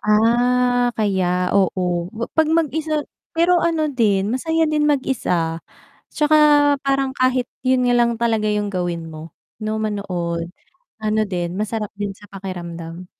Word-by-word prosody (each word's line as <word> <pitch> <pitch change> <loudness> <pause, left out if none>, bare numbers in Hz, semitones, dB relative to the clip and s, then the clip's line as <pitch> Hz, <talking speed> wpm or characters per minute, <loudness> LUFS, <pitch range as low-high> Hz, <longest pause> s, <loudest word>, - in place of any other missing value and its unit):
Ah, 245 +3 +3
kaya 200 -4 +1 0.3
oo, 190 -1 +2 0.4
wa 235 - -1
pag 320 -1 +4
mag-isa 315 0 -1 0.4
pero 345 +1 +4
ano 325 -2 +1
din 205 -2 +2
masaya 320 +5 +1
din 300 -1 +1
mag-isa, 180 - 0 0.5
'tsaka 305 0 +3 0.5
parang 275 -1 +1
kahit 255 -1 +1 0.2
yun 255 -1 +2
nga 245 - +3
lang 240 -1 +3
talaga 225 -2 0
yung 210 -1 -1
gawin 175 -3 -2
mo, 155 +1 -9 0.3
'no 215 0 -2
manood, 175 -5 -3 0.5
ano 215 0 +1
din 175 -2 -3
masarap 215 0 -3
din 205 -1 -3
sa 205 - -16
pakiramdam. 175 -2 -7
215 Hz, 135 wpm, -20 LUFS, 190-260 Hz, 0.5 s, pag